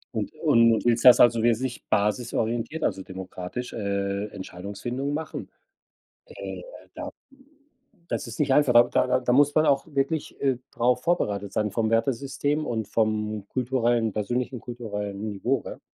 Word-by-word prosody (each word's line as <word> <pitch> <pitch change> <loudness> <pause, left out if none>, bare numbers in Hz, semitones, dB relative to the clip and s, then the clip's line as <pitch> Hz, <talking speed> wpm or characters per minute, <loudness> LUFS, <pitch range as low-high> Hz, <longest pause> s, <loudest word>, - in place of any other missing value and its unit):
Und - - -2
und 115 0 +4
willst 120 +1 +2
das 125 - +9
also 115 -1 +5
wirklich 120 +2 0
basisorientiert, 115 +6 0
also 95 -1 0
demokratisch, 95 +5 -7
äh, 100 -1 -2
Entscheidungsfindung 105 +10 -5
machen? 160 +2 -5 0.8
Äh, 470 - -8 0.3
da - - -6 1.0
das - - -2
ist 115 - -8
nicht 140 -2 +2
einfach, 145 -2 +4 0.2
da 130 - +2
da 125 0 +2
da 125 0 +1
muss 145 +2 +4
man 155 - +4
auch 140 -1 +2
wirklich, 145 +1 -2
äh, 135 -3 +2
drauf 125 +1 +1
vorbereitet 105 - 0
sein 105 -1 0
vom 110 0 0
Wertesystem 135 +6 0
und 110 -3 -2
vom 105 -1 -1
kulturellen, 120 -3 +1
persönlichen 125 +4 -2
kulturellen 105 -4 -5
Niveau, 120 +6 -1
ne? - - -7
120 Hz, 145 wpm, -26 LUFS, 105-130 Hz, 1.0 s, das